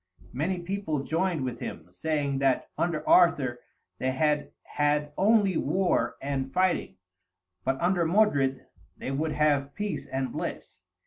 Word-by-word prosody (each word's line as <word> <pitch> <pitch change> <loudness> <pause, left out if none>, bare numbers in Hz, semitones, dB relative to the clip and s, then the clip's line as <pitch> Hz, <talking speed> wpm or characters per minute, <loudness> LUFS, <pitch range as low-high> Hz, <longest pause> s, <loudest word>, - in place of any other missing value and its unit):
Many 165 +9 -1
people 175 -5 -3
joined 165 -2 0
with 125 - -4
him, 80 - -6
saying 140 - -1
that 135 -1 +1
under 165 -3 -1
Arthur 140 -9 +4 0.4
they 130 - 0
had 150 +2 +1
had 150 0 0
only 200 -3 +3
war 190 -1 +1
and 135 -1 -3
fighting, 185 0 +1 0.7
but 135 +1 0
under 175 0 +2
Modred 145 -9 +2 0.3
they - - -4
would 150 +3 -1
have 145 -2 +1
peace 210 -1 -3
and 130 -2 -2
bliss. - - -6
150 Hz, 135 wpm, -28 LUFS, 135-180 Hz, 0.7 s, Arthur